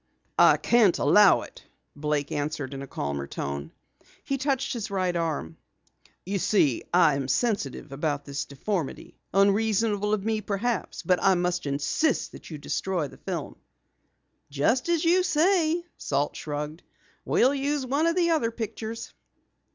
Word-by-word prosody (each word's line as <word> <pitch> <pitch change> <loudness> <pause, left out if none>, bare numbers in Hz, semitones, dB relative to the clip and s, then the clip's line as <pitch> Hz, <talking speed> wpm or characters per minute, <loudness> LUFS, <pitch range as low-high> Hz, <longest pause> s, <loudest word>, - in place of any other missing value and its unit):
"I - - +7
can't 225 -7 +4
allow 205 -2 +5
it," - - -13 0.3
Blake 150 -1 -1
answered 145 -2 -3
in 135 - -6
a 140 - -7
calmer 70 - -4
tone. 70 0 -5 0.5
He 275 0 -2
touched 270 0 0
his 230 -5 -4
right 185 -3 -1
arm. 155 - -2 0.7
"You 195 +2 -1
see, 155 - +2
I 170 -4 +5
am 140 -1 -2
sensitive 175 - -1
about 145 0 -2
this 140 0 -4
deformity. 155 +3 -4
Unreasonable 210 +1 +2
of 210 -2 0
me, 220 -1 0
perhaps, 215 +4 -2
but 180 -1 +2
I 195 -1 +4
must 175 -2 -1
insist 145 - 0
that - - -12
you 155 - -6
destroy 170 +1 -2
the - - -15
film." - - -5 0.9
"Just 190 - +1
as 335 -1 +1
you 355 +3 +5
say," 345 0 +2
Salt 145 +1 -1
shrugged. 150 +2 -5 0.4
"We'll 260 +3 +3
use 280 0 -1
one 285 +6 +1
of 335 - +1
the 345 -2 +2
other 300 -8 +2
pictures." 225 0 -6
195 Hz, 150 wpm, -26 LUFS, 145-245 Hz, 0.9 s, I